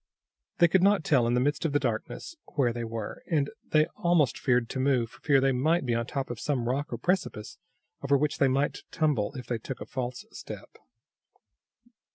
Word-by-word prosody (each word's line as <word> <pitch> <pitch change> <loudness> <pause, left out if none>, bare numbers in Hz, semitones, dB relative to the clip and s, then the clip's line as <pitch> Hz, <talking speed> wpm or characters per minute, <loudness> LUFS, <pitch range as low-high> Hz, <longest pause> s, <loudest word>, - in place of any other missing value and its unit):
They 170 - +6
could 185 +2 +3
not 200 -2 +4
tell, 130 -6 +3
in 120 - +2
the - - +3
midst 145 +3 0
of 160 -4 0
the 145 - +3
darkness, 125 - -3 0.2
where 125 -5 +2
they 120 0 -4
were, 115 -2 -5
and 145 -5 +1 0.2
they 155 0 +4
almost 170 -6 +3
feared 125 -2 +2
to 130 - -4
move 130 -4 +1
for - - -17
fear 140 -3 +4
they 135 0 +3
might 145 +5 +1
be 120 - 0
on 115 0 -1
top 135 -2 -3
of 120 - -6
some 125 -3 -1
rock 140 +4 -1
or 120 - -2
precipice, 130 - -2 0.4
over 140 0 +3
which 150 +1 -1
they 140 - +5
might 135 +3 0
tumble 145 -10 +1
if 125 -2 -6
they 120 -1 -2
took 130 +3 -6
a - - -6
false 125 -1 -5
step. - - -10
135 Hz, 210 wpm, -28 LUFS, 120-150 Hz, 0.4 s, They